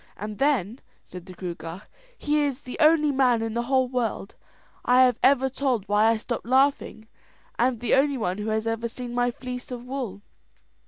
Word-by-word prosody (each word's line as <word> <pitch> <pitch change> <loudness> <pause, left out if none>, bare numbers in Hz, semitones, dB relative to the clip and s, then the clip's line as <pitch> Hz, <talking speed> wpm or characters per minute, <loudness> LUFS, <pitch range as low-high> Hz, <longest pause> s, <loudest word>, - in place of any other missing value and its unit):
"And 210 +1 -7
then," 260 -5 +1 0.2
said 180 0 -11
the 185 - -10
Gruagach, 170 +1 -7 0.3
"he 300 0 0
is 285 -2 -1
the 250 - -8
only 305 -1 +4
man 250 -4 +2
in 225 -1 -3
the 235 - 0
whole 260 +1 +1
world 240 -5 -3 0.5
I 250 +1 +5
have 250 -3 +2
ever 265 -1 +4
told 260 -6 -1
why 205 +2 +3
I 225 0 +3
stopped 235 +1 -5
laughing, 260 -4 +1 0.5
and 245 -1 +1
the 240 - -1
only 275 0 +3
one 195 -4 -2
who 210 +1 -3
has 220 0 -1
ever 225 +1 -2
seen 245 +1 -7
my 245 0 +1
fleece 250 0 -7
of 245 -1 -7
wool." 250 -7 -5
245 Hz, 190 wpm, -25 LUFS, 220-265 Hz, 0.5 s, I